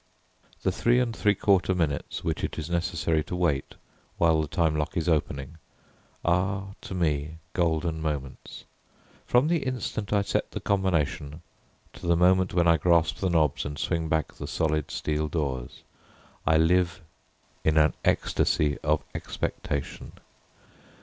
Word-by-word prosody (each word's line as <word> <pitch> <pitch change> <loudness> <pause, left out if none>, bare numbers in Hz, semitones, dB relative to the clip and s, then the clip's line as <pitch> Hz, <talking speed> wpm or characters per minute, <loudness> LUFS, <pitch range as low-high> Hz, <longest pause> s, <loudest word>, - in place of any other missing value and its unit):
The - - +2
three 120 +1 +2
and 120 -3 0
three 105 0 +2
quarter 95 -1 +2
minutes 80 -5 -2
which - - -2
it - - -3
is 80 +1 -5
necessary 85 -3 0
to 90 - -4
wait, 85 -6 0 0.4
while 80 -2 +4
the 75 - -3
time 80 0 +1
lock 75 +2 -2
is 85 - -1
opening, 75 -2 -1 0.7
are 95 +3 0
to 95 - -7
me 80 -2 -1 0.2
golden 80 -2 0
moments. 75 -4 -5 0.6
From 125 +4 +4
the 170 0 +2
instant 125 -6 -3
I 100 -1 +3
set - - -1
the - - -3
combination 80 -5 -1 0.5
to - - -8
the 85 - +4
moment 90 +1 +4
when 85 -1 +3
I 85 -1 +5
grasp 85 0 +3
the 95 - 0
knobs 75 -4 +2
and 75 0 -5
swing 80 -1 -1
back 80 0 0
the - - -7
solid 75 -2 0
steel 75 0 -1
doors, 70 -6 -3 0.6
I 80 0 +5
live 90 +2 +2 0.6
in 80 0 +2
an 75 -1 +5
ecstasy 75 -1 +1
of 75 0 +1
expectation. 70 -1 -4
80 Hz, 150 wpm, -27 LUFS, 75-90 Hz, 0.7 s, I